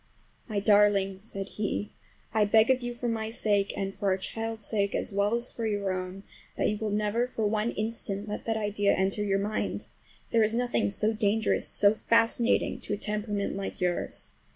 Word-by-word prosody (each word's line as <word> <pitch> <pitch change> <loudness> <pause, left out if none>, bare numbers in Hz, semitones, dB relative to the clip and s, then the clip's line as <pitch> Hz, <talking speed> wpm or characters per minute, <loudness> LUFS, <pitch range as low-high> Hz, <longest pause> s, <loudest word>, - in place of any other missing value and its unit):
"My 215 -4 -1
darling," 200 -2 +4
said 195 -1 -6
he, 210 0 -3 0.4
"I 220 -1 +4
beg 220 +4 +5
of 260 0 +2
you, 240 0 -4
for 240 0 -3
my 220 -1 -1
sake 205 -3 +1
and 195 0 -2
for 200 - -3
our 190 - +2
child's 225 +2 -4
sake, 200 -2 0
as - - -1
well 200 +3 +2
as 235 +1 -1
for 230 -1 -3
your 200 -3 -1
own, 185 +1 -5 0.3
that - - +2
you 210 - 0
will 220 - -2
never 210 +3 0
for 225 -3 -2
one 215 +2 +1
instant 215 -2 -3
let 210 - -5
that 225 -1 0
idea 205 -1 +1
enter 190 +2 0
your 195 -1 +1
mind! 205 +2 -2 0.4
There 230 - +4
is 220 +1 +2
nothing 240 - +1
so 215 - +1
dangerous, 215 0 +1
so 205 0 +4
fascinating, 230 +2 +2
to - - -3
a - - -1
temperament 210 -1 -2
like 195 +2 -5
yours. 180 -2 -1
210 Hz, 195 wpm, -28 LUFS, 200-225 Hz, 0.4 s, beg